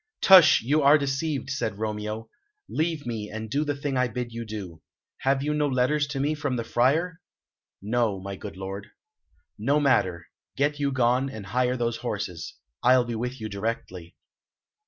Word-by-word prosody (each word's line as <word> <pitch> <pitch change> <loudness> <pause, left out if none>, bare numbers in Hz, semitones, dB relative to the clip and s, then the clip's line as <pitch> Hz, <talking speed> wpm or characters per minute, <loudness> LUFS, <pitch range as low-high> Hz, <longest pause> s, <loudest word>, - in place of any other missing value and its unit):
"Tush! 180 -9 +8
You 145 +6 +2
are 145 +2 +7
deceived," 140 -1 -2
said 110 -7 -2
Romeo. 105 +1 -4 0.4
"Leave 160 -2 -1
me, 110 -3 -4
and 110 0 -6
do 145 +4 +1
the 145 -1 -2
thing 140 -1 -2
I 125 0 +2
bid 120 +1 -4
you 115 0 -5
do. 100 -7 -7 0.4
Have 135 0 +1
you 150 +1 0
no 150 -1 +1
letters 140 +3 +1
to 140 -1 -4
me 145 +3 +1
from 145 -4 -2
the 115 - -2
Friar?" 155 +10 +1 0.6
"No, 110 -2 0
my 100 +1 -6
good 100 0 -9
lord." 95 +1 -6 0.7
"No 140 +7 +2
matter. 95 - +2 0.3
Get 145 +1 +1
you 140 -1 +1
gone, 130 +1 +2
and 110 -6 -8
hire 125 +5 0
those 120 -1 -1
horses. 100 -8 -5 0.3
I'll 125 0 +5
be 120 - -4
with 125 +3 -4
you 110 - -4
directly." 100 -4 -5
125 Hz, 175 wpm, -26 LUFS, 110-140 Hz, 0.7 s, Tush